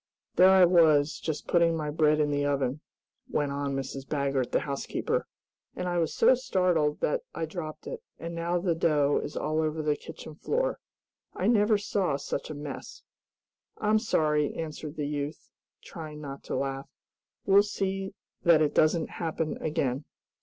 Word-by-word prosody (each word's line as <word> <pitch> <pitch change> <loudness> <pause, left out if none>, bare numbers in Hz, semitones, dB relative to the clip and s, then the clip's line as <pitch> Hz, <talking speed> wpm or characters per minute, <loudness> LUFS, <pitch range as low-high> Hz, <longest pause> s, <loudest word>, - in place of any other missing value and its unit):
There 185 +1 +7
I 190 -1 +7
was, 160 -4 +4
just 155 -2 -4
putting 170 -1 +3
my 150 -1 -2
bread 155 0 +3
in 150 -1 +2
the 145 0 0
oven," 140 0 0 0.5
went 145 -2 0
on 140 -1 -2
Mrs. 135 0 -4
Baggert, 140 -3 0
the - - +2
housekeeper, 140 -1 -2 0.5
"and 180 - -3
I 175 -1 0
was 165 -2 0
so - - +6
startled 180 - +1
that - - +1
I 165 +1 -1
dropped 155 -1 -7
it, 485 -2 -6 0.2
and 170 +1 -6
now 170 +1 -1
the 175 -1 +1
dough 150 -3 +2
is - - -6
all 155 +1 0
over 155 0 -1
the 150 -1 +2
kitchen 155 - -10
floor. - - -1 0.6
I 185 - -2
never 210 -1 +4
saw 195 -7 0
such 140 - -4
a 155 - -5
mess." 145 -1 -8 0.7
"I'm 215 +1 +2
sorry," 150 - +1
answered 155 -1 -5
the 150 -2 -2
youth, 145 +1 -4 0.3
trying 155 -2 -8
not 140 -2 -7
to - - -3
laugh. 135 +1 -3 0.6
"We'll 200 +1 +7
see 195 -1 -3 0.3
that 170 -2 +6
it 145 - 0
doesn't 160 +1 +2
happen 160 -2 -3
again." 140 -3 -1
155 Hz, 165 wpm, -28 LUFS, 145-175 Hz, 0.7 s, There